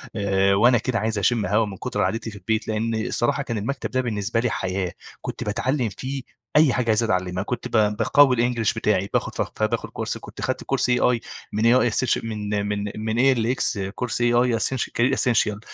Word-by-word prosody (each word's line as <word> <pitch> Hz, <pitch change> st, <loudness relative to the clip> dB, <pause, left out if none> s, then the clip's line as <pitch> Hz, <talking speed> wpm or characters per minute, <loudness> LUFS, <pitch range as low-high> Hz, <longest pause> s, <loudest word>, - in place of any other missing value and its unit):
آآ، 100 Hz, -2 st, +2 dB
وأنا 120 Hz, +4 st, +5 dB
كده 115 Hz, 0 st, -1 dB
عايز 110 Hz, 0 st, -1 dB
أشم 105 Hz, +2 st, +1 dB
هوا 105 Hz, +4 st, +2 dB
من 100 Hz, -2 st, -7 dB
كتر -, -, -3 dB
قعدتي 115 Hz, 0 st, -2 dB
في -, -, -11 dB
البيت، 110 Hz, +4 st, -2 dB
لأن 110 Hz, +1 st, -1 dB
الصراحة 140 Hz, +5 st, 0 dB
كان 115 Hz, -4 st, -3 dB
المكتب 130 Hz, +7 st, -3 dB
ده 130 Hz, -, +1 dB
بالنسبة 110 Hz, -2 st, -1 dB
لي 120 Hz, 0 st, +1 dB
حياة، 95 Hz, -2 st, -2 dB, 0.3 s
كنت -, -, -5 dB
باتعلم 125 Hz, +4 st, -1 dB
فيه 130 Hz, +6 st, -5 dB, 0.3 s
أي 150 Hz, -4 st, +5 dB
حاجة 125 Hz, -2 st, -1 dB
عايز 110 Hz, +1 st, +3 dB
أتعلمها، 90 Hz, -3 st, -1 dB
كنت 120 Hz, +2 st, -4 dB
ب -, -, -16 dB, 0.3 s
باقوّي 140 Hz, +1 st, +5 dB
الEnglish 120 Hz, -2 st, +1 dB
بتاعي 100 Hz, -2 st, 0 dB
باخد -, -, -1 dB
ف -, -, -1 dB
ف -, -, -4 dB
باخد -, -, -1 dB
كورس -, -, -3 dB
كنت -, -, -12 dB
أخدت -, -, -2 dB
كورس -, -, 0 dB
AI 125 Hz, -1 st, +3 dB, 0.3 s
من 110 Hz, +2 st, 0 dB
AI 125 Hz, -2 st, +3 dB
Essenti 130 Hz, -2 st, +1 dB
من 105 Hz, -2 st, -2 dB
من 105 Hz, 0 st, -2 dB
من 110 Hz, +1 st, -3 dB
ALX 125 Hz, -3 st, +2 dB, 0.2 s
كورس 120 Hz, -1 st, -2 dB
AI 120 Hz, 0 st, +3 dB
Essenti 130 Hz, +3 st, -1 dB
Career 125 Hz, +3 st, +3 dB
Essential 110 Hz, -5 st, +1 dB
115 Hz, 200 wpm, -23 LUFS, 105-125 Hz, 0.3 s, وأنا